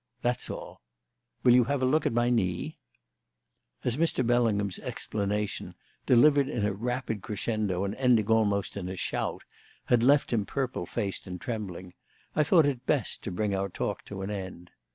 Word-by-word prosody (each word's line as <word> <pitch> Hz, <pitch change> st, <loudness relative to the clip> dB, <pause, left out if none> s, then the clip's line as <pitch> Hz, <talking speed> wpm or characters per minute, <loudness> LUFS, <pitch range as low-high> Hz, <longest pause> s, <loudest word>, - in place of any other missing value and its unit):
That's 120 Hz, 0 st, -1 dB
all. -, -, -7 dB, 0.6 s
Will 125 Hz, -, +7 dB
you 125 Hz, -1 st, +6 dB
have 140 Hz, 0 st, 0 dB
a -, -, +4 dB
look 150 Hz, +4 st, +2 dB
at -, -, 0 dB
my 120 Hz, +1 st, +2 dB
knee?" 90 Hz, -7 st, -1 dB, 1.0 s
As 125 Hz, +1 st, 0 dB
Mr. 160 Hz, -5 st, +1 dB
Bellingham's 110 Hz, -5 st, +1 dB
explanation 105 Hz, 0 st, -3 dB, 0.3 s
(delivered 140 Hz, +2 st, +5 dB
in 105 Hz, -7 st, -1 dB
a 105 Hz, -, 0 dB
rapid 120 Hz, 0 st, -3 dB
crescendo 105 Hz, -3 st, -2 dB
and 100 Hz, 0 st, -2 dB
ending 125 Hz, -3 st, +3 dB
almost 105 Hz, -3 st, +1 dB
in 90 Hz, -2 st, -4 dB
a 95 Hz, -, -4 dB
shout) -, -, -3 dB, 0.4 s
had 120 Hz, -2 st, +3 dB
left 140 Hz, +1 st, +4 dB
him 110 Hz, -3 st, +2 dB
purple 130 Hz, +4 st, -3 dB
faced 100 Hz, -5 st, -3 dB
and 90 Hz, -1 st, -6 dB
trembling, 95 Hz, -5 st, -5 dB, 0.4 s
I -, -, +4 dB
thought 160 Hz, +1 st, +5 dB
it 130 Hz, -3 st, -2 dB
best 140 Hz, -7 st, 0 dB
to 100 Hz, -, -3 dB
bring 100 Hz, +3 st, -1 dB
our 100 Hz, 0 st, -1 dB
talk -, -, -3 dB
to 95 Hz, -1 st, -6 dB
an 100 Hz, -, -3 dB
end. 95 Hz, -3 st, -7 dB
110 Hz, 175 wpm, -28 LUFS, 100-125 Hz, 1.0 s, Will